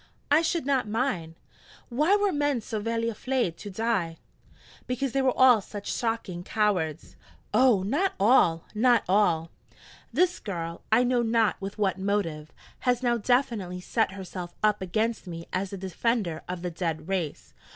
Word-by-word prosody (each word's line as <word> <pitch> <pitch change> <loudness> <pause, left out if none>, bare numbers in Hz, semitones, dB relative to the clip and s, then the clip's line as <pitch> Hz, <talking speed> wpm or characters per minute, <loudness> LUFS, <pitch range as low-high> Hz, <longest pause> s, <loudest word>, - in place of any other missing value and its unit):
'I 300 +2 +6
should 335 -2 -1
not 270 -4 +1
mind. 210 -8 -2 0.5
Why 300 +11 +3
were 410 -1 +2
men 290 -4 +1
so 220 0 -4
vely 230 +2 -1
aflaid 230 -4 -1
to 205 - -8
die?' 190 -5 -1 0.7
'Because 250 +1 -1
they 275 - +1
were 260 -1 +1
all 250 -4 +7
such 205 +1 -6
shocking 225 -7 -2
cowards.' 185 -8 -1 0.4
'Oh, 245 -7 +4
not 300 - 0
all! 190 -7 +4
not 240 +2 +4
all!' 175 -4 +2 0.6
(This 355 +8 +2
girl, 170 -4 -5
I 230 +3 +5
know 245 -1 +2
not 225 -3 +1
with 195 +2 -6
what 195 -3 0
motive, 180 -6 -2 0.3
has 250 0 +1
now 240 -1 +2
definitely 220 -6 0
set 180 - 0
herself 185 -2 -7
up 210 -1 +3
against 215 +4 -1
me 165 -1 -7
as 190 +1 -1
the 195 - -6
defender 190 -1 -1
of 180 -1 -4
the 180 - -2
dead 165 -2 -3
race. 185 -6 -3
210 Hz, 160 wpm, -27 LUFS, 180-245 Hz, 0.7 s, all